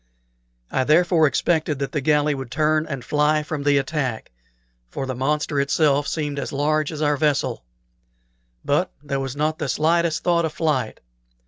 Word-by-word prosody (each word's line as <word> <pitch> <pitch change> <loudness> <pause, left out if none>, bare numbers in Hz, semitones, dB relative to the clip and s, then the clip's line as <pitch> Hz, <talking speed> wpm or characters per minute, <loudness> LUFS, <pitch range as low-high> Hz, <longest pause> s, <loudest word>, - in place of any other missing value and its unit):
I 130 - +1
therefore 160 +2 +4
expected 155 +2 0
that 140 0 -3
the 150 - -2
galley 150 +1 +2
would 135 -3 -6
turn 155 +3 +1
and 135 -5 -5
fly 150 +1 +2
from 150 -1 -4
the 145 0 +3
attack, 135 -5 -2 0.6
for 135 - -4
the 130 - -3
monster 145 +3 -1
itself 145 0 +2
seemed 145 -3 -2
as - - -4
large 150 +2 0
as 155 -1 -4
our 145 -1 +2
vessel; 145 - 0 1.0
but 150 +6 +1
there 140 -2 -2
was 135 -1 -4
not 155 +2 -1
the 150 - -2
slightest 165 +2 +1
thought 170 -1 +2
of 160 -2 -2
flight. 150 -8 -1
150 Hz, 165 wpm, -22 LUFS, 140-155 Hz, 1.0 s, therefore